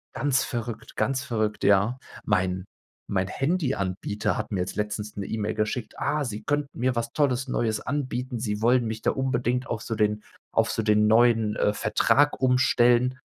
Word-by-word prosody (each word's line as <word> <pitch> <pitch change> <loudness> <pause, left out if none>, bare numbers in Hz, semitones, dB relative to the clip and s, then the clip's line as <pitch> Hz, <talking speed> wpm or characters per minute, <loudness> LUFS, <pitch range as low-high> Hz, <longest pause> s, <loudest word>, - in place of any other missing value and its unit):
Ganz 135 +1 +1
verrückt, 115 -2 -5
ganz 130 0 0
verrückt. 110 -5 -2
Ja, 100 +6 +3 0.3
mein 90 0 0 0.5
mein 95 -1 +1
Handyanbieter 115 - -1
hat - - -4
mir 100 - -1
jetzt 90 - -4
letztens 105 0 -3
'ne 100 - -3
E-Mail 105 0 -2
geschickt: 110 +1 -2
„Ah, 150 0 0
sie 110 -4 -5
könnten 145 -1 -2
mir 125 +1 +1
was 115 0 -2
Tolles 135 -3 +1
Neues 115 -4 0
anbieten. 130 -2 -3
Sie 105 -2 -3
wollen 120 +1 +3
mich 110 0 -4
da - - +2
unbedingt 125 -2 -1
auf 110 - -3
so 115 - -4
den 105 0 0 0.3
auf - - +2
so 110 - -1
den 105 0 +3
neuen, 115 -1 +4
äh, 105 - +1
Vertrag 140 +8 +2
umstellen.“ 125 0 +3
115 Hz, 170 wpm, -26 LUFS, 105-130 Hz, 0.5 s, neuen